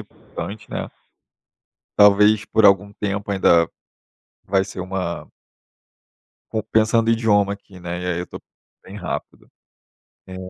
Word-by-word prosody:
importante, 105 Hz, +2 st, -9 dB
né, -, -, -4 dB, 1.1 s
talvez 105 Hz, +1 st, +5 dB
por 110 Hz, 0 st, +1 dB
algum 100 Hz, +1 st, +3 dB
tempo 100 Hz, 0 st, -4 dB
ainda, 85 Hz, -4 st, +4 dB, 0.8 s
vai 95 Hz, 0 st, +2 dB
ser 95 Hz, -1 st, -9 dB
uma 90 Hz, -1 st, -4 dB, 1.2 s
com 110 Hz, -, -1 dB
pensando 115 Hz, +1 st, +3 dB
idioma 105 Hz, -3 st, +2 dB
aqui, 100 Hz, -2 st, -14 dB
né, 85 Hz, 0 st, -5 dB
e -, -, -5 dB
aí 90 Hz, -1 st, -1 dB
eu 90 Hz, -, -5 dB
tô -, -, -9 dB
com -, -, -40 dB, 0.4 s
bem 95 Hz, -, -11 dB
rápido. 95 Hz, -5 st, -6 dB, 0.8 s
Eh, 95 Hz, -, -9 dB
100 Hz, 130 wpm, -21 LUFS, 95-105 Hz, 1.2 s, talvez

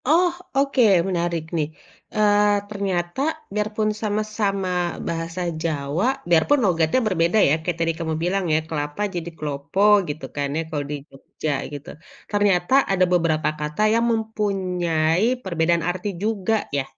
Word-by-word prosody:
Oh 350 Hz, +3 st, +4 dB, 0.3 s
oke 275 Hz, -1 st, +2 dB, 0.3 s
menarik 170 Hz, -2 st, -1 dB
nih, 150 Hz, -2 st, 0 dB, 0.5 s
eee, 210 Hz, -1 st, +4 dB, 0.2 s
ternyata 190 Hz, 0 st, -2 dB, 0.3 s
biarpun 215 Hz, +1 st, 0 dB
sama-sama 210 Hz, -2 st, -1 dB, 0.4 s
bahasa 165 Hz, +2 st, -3 dB, 0.2 s
Jawa, 155 Hz, +3 st, -1 dB, 0.2 s
biarpun 175 Hz, -, +4 dB
logatnya 165 Hz, +3 st, +2 dB
berbeda 175 Hz, 0 st, +2 dB
ya -, -, +4 dB
kayak 170 Hz, 0 st, -2 dB
tadi 165 Hz, 0 st, +1 dB
kamu 160 Hz, -1 st, -2 dB
bilang 190 Hz, +2 st, 0 dB
ya -, -, +4 dB
"kelapa" 150 Hz, +2 st, -3 dB
jadi 170 Hz, -1 st, -3 dB
"klopo" 145 Hz, +4 st, -3 dB, 0.3 s
gitu 150 Hz, +2 st, -5 dB
kan 145 Hz, -1 st, -1 dB
ya -, -, +1 dB
kalau 150 Hz, -3 st, -2 dB
di -, -, -1 dB
Jogja 140 Hz, +3 st, -5 dB, 0.2 s
gitu 145 Hz, 0 st, -8 dB, 0.4 s
ternyata 205 Hz, -1 st, +2 dB, 0.2 s
ada 185 Hz, -1 st, +4 dB
beberapa 160 Hz, -3 st, +2 dB
kata 150 Hz, +5 st, -3 dB
yang 230 Hz, +1 st, +2 dB
mempunyai 185 Hz, -6 st, 0 dB, 0.2 s
perbedaan 170 Hz, -2 st, +1 dB
arti 185 Hz, +3 st, -3 dB
juga 220 Hz, 0 st, 0 dB, 0.2 s
ya? 140 Hz, -, +1 dB
175 Hz, 140 wpm, -23 LUFS, 160-205 Hz, 0.5 s, Oh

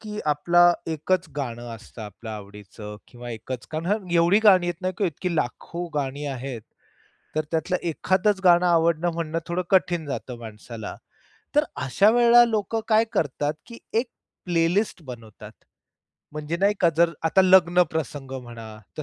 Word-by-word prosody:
की 210 Hz, -1 st, -7 dB
आपला 175 Hz, +4 st, +4 dB, 0.2 s
एकच 175 Hz, +3 st, -1 dB
गाणं 120 Hz, -3 st, -4 dB
असतं 110 Hz, 0 st, -11 dB
आपलं 110 Hz, +2 st, -9 dB
आवडीचं 105 Hz, 0 st, -9 dB
किंवा 120 Hz, -1 st, -9 dB
एकच 125 Hz, +3 st, -6 dB
कारण 180 Hz, +5 st, -2 dB
एवढी 170 Hz, +3 st, +4 dB
गाणी 185 Hz, -4 st, +6 dB
येत 175 Hz, 0 st, -3 dB
नाही 185 Hz, 0 st, -1 dB
की 205 Hz, -, +1 dB
इतकी 170 Hz, +2 st, -3 dB
लाखो 170 Hz, +5 st, -3 dB
गाणी 140 Hz, 0 st, -2 dB
आहेत. 130 Hz, -4 st, -5 dB, 0.7 s
तर 155 Hz, -, +1 dB
त्यातलं 165 Hz, +3 st, 0 dB
एखादचं 190 Hz, +4 st, +1 dB
गाणं 175 Hz, 0 st, +6 dB
आवडणं 170 Hz, 0 st, +2 dB
म्हणणं 165 Hz, -1 st, -2 dB
थोडं 175 Hz, +1 st, -1 dB
कठीण 175 Hz, -4 st, +2 dB
जातं 125 Hz, -3 st, -5 dB
माणसाला. 110 Hz, -1 st, -8 dB, 0.6 s
तर -, -, +4 dB, 0.2 s
अशा 195 Hz, -, +4 dB
वेळेला 240 Hz, 0 st, +6 dB
लोकं 225 Hz, -1 st, -1 dB
काय 220 Hz, 0 st, +4 dB
करतात, 145 Hz, -, -1 dB
की 235 Hz, -1 st, -11 dB, 0.2 s
एक 240 Hz, +2 st, -1 dB, 0.4 s
प्लेलिस्ट 175 Hz, +3 st, 0 dB
बनवतात. 115 Hz, -5 st, -11 dB, 0.8 s
म्हणजे 150 Hz, +2 st, -4 dB
नाही 200 Hz, +3 st, +2 dB
का 170 Hz, -, +5 dB
जर 170 Hz, 0 st, +4 dB
आता 190 Hz, +4 st, +4 dB
लग्न 180 Hz, -1 st, +5 dB
प्रसंग 145 Hz, -4 st, -4 dB
म्हणा 115 Hz, -2 st, -10 dB, 0.3 s
तर 155 Hz, -, -4 dB
165 Hz, 150 wpm, -24 LUFS, 125-185 Hz, 0.8 s, गाणी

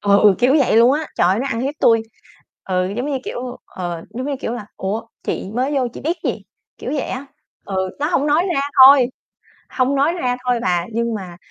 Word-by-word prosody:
Ừ, 200 Hz, 0 st, +5 dB
kiểu 255 Hz, +4 st, +3 dB
vậy 265 Hz, -5 st, +3 dB
luôn 240 Hz, +3 st, +6 dB
á, 305 Hz, +1 st, -1 dB
trời 175 Hz, -, +4 dB
ơi, 190 Hz, -, +2 dB
nó 275 Hz, -, -2 dB
ăn 230 Hz, -3 st, -2 dB
hiếp 275 Hz, +3 st, -2 dB
tui. 225 Hz, -1 st, +4 dB, 0.6 s
Ừ, 185 Hz, 0 st, -1 dB
giống 250 Hz, +4 st, -2 dB
như 270 Hz, -, -1 dB
kiểu 250 Hz, 0 st, -5 dB
ờ, 175 Hz, -2 st, -6 dB
giống 255 Hz, +3 st, -5 dB
như 285 Hz, -, -2 dB
kiểu -, -, -3 dB
là 240 Hz, -4 st, -6 dB
"Ủa, 200 Hz, +4 st, -3 dB, 0.2 s
chị 190 Hz, -, -4 dB
mới 260 Hz, +4 st, 0 dB
vô 265 Hz, -3 st, +1 dB
chị -, -, -9 dB
biết 330 Hz, +4 st, -1 dB
gì?" -, -, -2 dB, 0.4 s
Kiểu -, -, -5 dB
vậy 290 Hz, -, 0 dB
á. 270 Hz, +2 st, -5 dB, 0.4 s
Ừ, 190 Hz, -1 st, -2 dB
nó 295 Hz, -, +1 dB
hông 300 Hz, -4 st, +1 dB
nói 300 Hz, +4 st, +3 dB
ra -, -, +1 dB, 0.2 s
thôi. 270 Hz, -2 st, +7 dB, 0.6 s
Hông 260 Hz, +2 st, 0 dB
nói 280 Hz, +4 st, +3 dB
ra 250 Hz, -8 st, -1 dB
thôi 245 Hz, -1 st, +1 dB
bà, 175 Hz, -4 st, 0 dB
nhưng 235 Hz, +1 st, -1 dB
mà 180 Hz, -4 st, -8 dB
245 Hz, 225 wpm, -19 LUFS, 200-275 Hz, 0.6 s, thôi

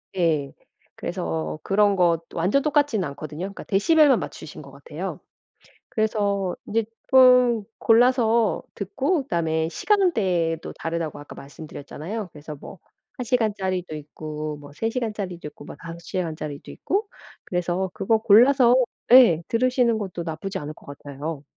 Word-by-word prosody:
예. 155 Hz, -6 st, 0 dB, 0.4 s
그래서 80 Hz, -2 st, -4 dB
그런 205 Hz, 0 st, +3 dB
거 170 Hz, -3 st, +2 dB
완전 190 Hz, +12 st, +1 dB
똑같진 290 Hz, -9 st, +1 dB
않거든요. 150 Hz, +1 st, -7 dB
그러니까 200 Hz, -, -8 dB
데시벨만 280 Hz, +6 st, +4 dB
맞추신 155 Hz, -, -8 dB
것 140 Hz, -1 st, -13 dB
같아요. 150 Hz, +6 st, -7 dB, 0.7 s
그래서 200 Hz, -4 st, 0 dB
이제 225 Hz, +1 st, 0 dB, 0.3 s
쪼끔 250 Hz, -4 st, +6 dB
골라서 230 Hz, -1 st, +3 dB
듣고 270 Hz, -, -1 dB
그다음에 160 Hz, -, -1 dB
시간대도 185 Hz, -, +1 dB
다르다고 165 Hz, -2 st, -3 dB
아까 145 Hz, -, -11 dB
말씀드렸잖아요. 160 Hz, +7 st, -8 dB
그래서 150 Hz, 0 st, -9 dB
뭐 170 Hz, +5 st, -12 dB, 0.4 s
1 250 Hz, -, -4 dB
시간짜리도 190 Hz, -8 st, -1 dB
있고, 150 Hz, 0 st, -6 dB
뭐 145 Hz, 0 st, -13 dB
3 225 Hz, +8 st, -2 dB
시간짜리도 210 Hz, -8 st, -4 dB
있고, 145 Hz, 0 st, -14 dB
뭐 -, -, -9 dB
5 170 Hz, 0 st, -8 dB
시간 170 Hz, -4 st, -3 dB
짜리도 150 Hz, -2 st, -7 dB
있고 410 Hz, +3 st, -2 dB, 0.4 s
그래서 180 Hz, +1 st, -2 dB
그거 220 Hz, +3 st, +1 dB
골라서 240 Hz, +3 st, +6 dB, 0.4 s
예 225 Hz, -11 st, +7 dB
들으시는 245 Hz, -1 st, +2 dB
것도 180 Hz, -4 st, -5 dB
나쁘지 180 Hz, +4 st, -5 dB
않을 150 Hz, -1 st, -6 dB
것 -, -, -19 dB
같아요. 145 Hz, +1 st, -7 dB
185 Hz, 320 characters per minute, -24 LUFS, 155-230 Hz, 0.7 s, 예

